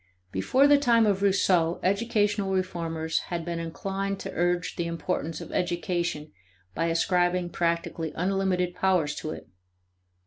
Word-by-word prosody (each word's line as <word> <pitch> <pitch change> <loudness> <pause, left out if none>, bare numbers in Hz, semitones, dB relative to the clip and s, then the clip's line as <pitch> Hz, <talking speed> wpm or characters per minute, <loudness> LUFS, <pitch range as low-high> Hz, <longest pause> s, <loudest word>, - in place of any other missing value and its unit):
Before 255 - +3
the 290 0 +6
time 235 -4 +4
of 200 -2 +1
Rousseau 185 -4 +2
educational 205 0 +1
reformers 165 -3 -1
had 170 -2 -3
been 170 -1 -3
inclined 195 +4 -3
to - - -5
urge 175 0 0
the 170 - -2
importance 165 -1 -3
of - - -9
education 175 -3 -2 0.4
by 165 - -1
ascribing 175 +1 +1
practically 170 -2 -1
unlimited 185 -1 0
power 185 -3 +2
to 155 +1 -4
it. - - -7
175 Hz, 135 wpm, -27 LUFS, 165-195 Hz, 0.4 s, the